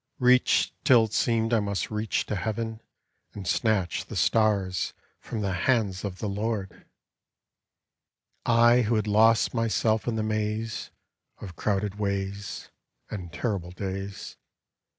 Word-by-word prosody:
Reached 125 Hz, 0 st, +4 dB
till 120 Hz, -3 st, +6 dB
it 110 Hz, -1 st, -4 dB
seemed 115 Hz, 0 st, +1 dB
I 115 Hz, -, +4 dB
must 100 Hz, 0 st, -2 dB
reach 105 Hz, 0 st, -1 dB
to -, -, -3 dB
heaven 110 Hz, +2 st, -3 dB, 0.5 s
And 100 Hz, -3 st, -7 dB
snatch 100 Hz, -5 st, 0 dB
the -, -, -7 dB
stars 100 Hz, -5 st, +1 dB, 0.3 s
from 110 Hz, -, -5 dB
the 100 Hz, -2 st, -1 dB
hands 100 Hz, -1 st, +1 dB
of 95 Hz, -3 st, -4 dB
the 105 Hz, -, -3 dB
Lord 100 Hz, -2 st, -3 dB, 1.6 s
I 120 Hz, +1 st, +5 dB
I -, -, +4 dB
who 115 Hz, 0 st, +1 dB
had 110 Hz, -1 st, +1 dB
lost 110 Hz, +2 st, +4 dB
myself 115 Hz, -1 st, +1 dB
in 120 Hz, -, 0 dB
the 110 Hz, -, -1 dB
maze 110 Hz, +1 st, -2 dB, 0.5 s
Of 90 Hz, -5 st, -9 dB
crowded 105 Hz, 0 st, -1 dB
ways 100 Hz, 0 st, -3 dB, 0.4 s
And 90 Hz, -5 st, -6 dB
terrible 95 Hz, -2 st, -2 dB
days. 95 Hz, +2 st, -6 dB
105 Hz, 135 wpm, -27 LUFS, 100-115 Hz, 1.6 s, till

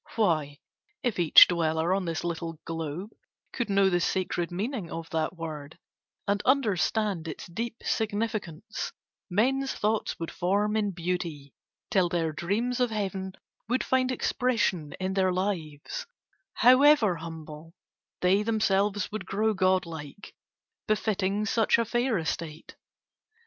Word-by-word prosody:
Why, 155 Hz, -10 st, +1 dB, 0.5 s
if 240 Hz, -6 st, -1 dB
each 170 Hz, -3 st, +9 dB
dweller 165 Hz, 0 st, +1 dB
on 190 Hz, -1 st, 0 dB
this 165 Hz, -2 st, -3 dB
little 165 Hz, -2 st, -4 dB
globe 165 Hz, +5 st, -4 dB, 0.4 s
Could 240 Hz, -3 st, -2 dB
know 195 Hz, -1 st, +4 dB
the 175 Hz, -2 st, +2 dB
sacred 175 Hz, -1 st, -1 dB
meaning 205 Hz, +1 st, -3 dB
of 165 Hz, 0 st, -6 dB
that 160 Hz, +2 st, -1 dB
word 155 Hz, -1 st, -7 dB, 0.5 s
And 200 Hz, +1 st, +1 dB
understand 210 Hz, -, +1 dB
its 160 Hz, -, -6 dB
deep 225 Hz, +6 st, -5 dB
significance, 215 Hz, -3 st, -2 dB, 0.4 s
Men's 265 Hz, +8 st, +1 dB
thoughts 215 Hz, +1 st, -1 dB
would 165 Hz, -, -4 dB
form 200 Hz, +4 st, 0 dB
in 210 Hz, -2 st, +1 dB
beauty, 170 Hz, -6 st, -4 dB, 0.4 s
till 190 Hz, -6 st, +3 dB
their 165 Hz, -2 st, 0 dB
dreams 215 Hz, -, -1 dB
Of 250 Hz, -1 st, +2 dB
heaven 195 Hz, -3 st, -3 dB, 0.4 s
would 255 Hz, +2 st, +1 dB
find 260 Hz, 0 st, +1 dB
expression 230 Hz, -, 0 dB
in 185 Hz, 0 st, -1 dB
their 190 Hz, -1 st, +2 dB
lives, 185 Hz, -, -3 dB, 0.5 s
However 255 Hz, -, +6 dB
humble; 160 Hz, 0 st, -9 dB, 0.5 s
they 185 Hz, +3 st, +4 dB
themselves 205 Hz, -2 st, +1 dB
would 215 Hz, -, -5 dB
grow 215 Hz, +2 st, +1 dB
Godlike, 185 Hz, -3 st, -1 dB, 0.5 s
befitting 205 Hz, -1 st, 0 dB
such 225 Hz, +1 st, +3 dB
a 230 Hz, -, +1 dB
fair 240 Hz, 0 st, +1 dB
estate. 160 Hz, -1 st, -4 dB
190 Hz, 130 wpm, -28 LUFS, 165-220 Hz, 0.5 s, each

